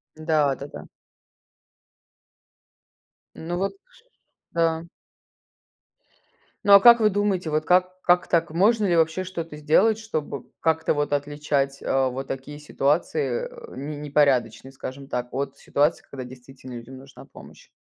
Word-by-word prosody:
Да, 155 Hz, -3 st, +1 dB
да, 140 Hz, -, -8 dB
да. -, -, -10 dB, 2.5 s
Ну, 170 Hz, +2 st, -4 dB
вот 195 Hz, +2 st, -1 dB, 0.8 s
да. 165 Hz, -1 st, +1 dB, 1.8 s
Ну, 205 Hz, -, +4 dB
а 200 Hz, -, +11 dB
как 235 Hz, +2 st, +8 dB
вы 215 Hz, -, +5 dB
думаете, 195 Hz, -4 st, 0 dB
вот 155 Hz, 0 st, -1 dB
как 185 Hz, +1 st, +2 dB
как 175 Hz, 0 st, +3 dB
так? 165 Hz, -2 st, +1 dB
Можно 210 Hz, +6 st, +3 dB
ли 175 Hz, -3 st, +2 dB
вообще 160 Hz, +2 st, +2 dB
что-то 165 Hz, -4 st, -6 dB
сделать, 160 Hz, +9 st, +3 dB
чтобы 155 Hz, -, -5 dB, 0.2 s
как-то 160 Hz, 0 st, +1 dB
вот 145 Hz, -1 st, -1 dB
отличать, 145 Hz, -1 st, -1 dB
а, 135 Hz, 0 st, +2 dB
вот 135 Hz, +2 st, -6 dB
такие 135 Hz, +2 st, -6 dB
ситуации, 170 Hz, -, -1 dB
э, 485 Hz, -1 st, -12 dB
не 145 Hz, +2 st, -6 dB
непорядочные, 135 Hz, -5 st, +1 dB
скажем 135 Hz, +1 st, -8 dB
так, 125 Hz, -2 st, -3 dB
от 140 Hz, +1 st, -3 dB
ситуаций, 145 Hz, +3 st, 0 dB
когда 135 Hz, -2 st, -7 dB
действительно 130 Hz, +1 st, -12 dB
людям 120 Hz, +3 st, -10 dB
нужна 135 Hz, 0 st, -14 dB
помощь? -, -, -15 dB
150 Hz, 135 wpm, -24 LUFS, 135-180 Hz, 2.5 s, а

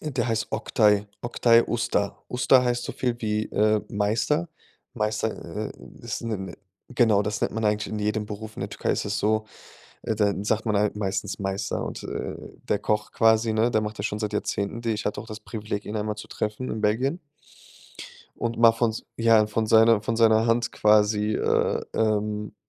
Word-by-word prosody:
Äh, 155 Hz, -, -4 dB
der -, -, 0 dB
heißt 110 Hz, -1 st, -1 dB
Oktay 105 Hz, -2 st, +2 dB, 0.2 s
Oktay 120 Hz, -1 st, +4 dB
Usta. 110 Hz, -3 st, -1 dB
Usta 125 Hz, +1 st, +4 dB
heißt 120 Hz, 0 st, 0 dB
so -, -, -4 dB
viel, 125 Hz, -2 st, -1 dB
wie, 105 Hz, -1 st, 0 dB
äh, 105 Hz, 0 st, +2 dB
Meister. 110 Hz, +11 st, 0 dB, 0.5 s
Meister, 110 Hz, 0 st, -1 dB, 0.4 s
äh, -, -, -14 dB, 0.3 s
ist -, -, -4 dB
'ne 115 Hz, -2 st, -2 dB
'ne 95 Hz, -2 st, -7 dB, 0.3 s
Genau, 115 Hz, -5 st, +3 dB
das 105 Hz, 0 st, -3 dB
nennt -, -, 0 dB
man 110 Hz, 0 st, -2 dB
eigentlich 105 Hz, 0 st, 0 dB
in 105 Hz, -, -2 dB
jedem 105 Hz, 0 st, -1 dB
Beruf 110 Hz, +1 st, -7 dB
in -, -, -6 dB
der -, -, -4 dB
Türkei -, -, -2 dB
ist -, -, -2 dB
es 100 Hz, -1 st, -2 dB
so, 110 Hz, +1 st, +1 dB, 0.6 s
äh, 110 Hz, -, -1 dB
da 105 Hz, -1 st, +2 dB
sagt 110 Hz, +2 st, 0 dB
man 105 Hz, -1 st, +2 dB
halt 105 Hz, 0 st, +1 dB
meistens 100 Hz, -1 st, -3 dB
Meister. 95 Hz, 0 st, -2 dB
Und, -, -, -6 dB
äh, -, -, -4 dB, 0.3 s
der -, -, +3 dB
Koch 105 Hz, 0 st, -1 dB
quasi, 110 Hz, 0 st, +3 dB
ne, 115 Hz, +2 st, +2 dB
der 110 Hz, -, +2 dB
macht 105 Hz, 0 st, -5 dB
das -, -, -1 dB
schon 105 Hz, -, -3 dB
seit 105 Hz, -1 st, -2 dB
Jahrzehnten, 105 Hz, +2 st, -2 dB
die 115 Hz, -, -1 dB
ich 110 Hz, -1 st, -3 dB
hatte 105 Hz, -, -2 dB
auch -, -, -8 dB
das 110 Hz, 0 st, -7 dB
Privileg, 105 Hz, -1 st, -5 dB
ihn 105 Hz, -, -5 dB
einmal 105 Hz, 0 st, -2 dB
zu 105 Hz, -, -9 dB
treffen 110 Hz, +4 st, -4 dB
in 110 Hz, -, -3 dB
Belgien 130 Hz, +10 st, +1 dB, 1.2 s
und 115 Hz, 0 st, -3 dB
mal 115 Hz, -1 st, +7 dB
von 115 Hz, -1 st, 0 dB, 0.2 s
ja, 115 Hz, -2 st, +4 dB
von 110 Hz, +1 st, -1 dB
seiner 110 Hz, 0 st, +5 dB
von 115 Hz, +1 st, -1 dB
seiner 110 Hz, 0 st, +4 dB
Hand 115 Hz, +1 st, +1 dB
quasi, 105 Hz, 0 st, +3 dB
äh, -, -, +1 dB
ähm, 105 Hz, -1 st, 0 dB
110 Hz, 200 wpm, -25 LUFS, 105-115 Hz, 1.2 s, mal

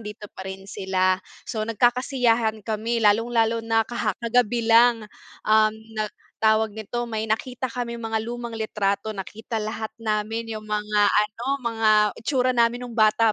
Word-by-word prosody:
nandito 210 Hz, -1 st, -8 dB
pa -, -, -7 dB
rin 190 Hz, 0 st, -7 dB
sila, 190 Hz, -1 st, 0 dB, 0.3 s
so, 220 Hz, -3 st, -3 dB
nagkakasiyahan 235 Hz, -1 st, +1 dB
kami 225 Hz, +2 st, -1 dB
lalong-lalo 230 Hz, +2 st, +3 dB
na 225 Hz, -1 st, +1 dB
kaha 235 Hz, -3 st, -1 dB
kagabi 235 Hz, -1 st, +1 dB
lang, 230 Hz, 0 st, +5 dB, 0.4 s
um, 215 Hz, 0 st, +5 dB, 0.2 s
na 215 Hz, -1 st, -1 dB, 0.4 s
tawag 220 Hz, 0 st, +3 dB
nito 240 Hz, +3 st, -4 dB
may 220 Hz, -1 st, -2 dB
nakita 245 Hz, +3 st, -2 dB
kaming 235 Hz, -1 st, -4 dB
mga 225 Hz, 0 st, -1 dB
lumang 235 Hz, +1 st, -5 dB
litrato 215 Hz, -2 st, -1 dB
nakita 220 Hz, +4 st, -6 dB
lahat 220 Hz, 0 st, -3 dB
namin 225 Hz, +1 st, -2 dB
yung 215 Hz, -1 st, -7 dB
mga 210 Hz, -1 st, +2 dB
ano, 210 Hz, +3 st, 0 dB, 0.2 s
mga 225 Hz, -2 st, +1 dB, 0.3 s
itsura 255 Hz, +1 st, +1 dB
namin 240 Hz, 0 st, +2 dB
nung 245 Hz, -, -8 dB
bata 220 Hz, 0 st, +4 dB
225 Hz, 150 wpm, -24 LUFS, 215-235 Hz, 0.4 s, lang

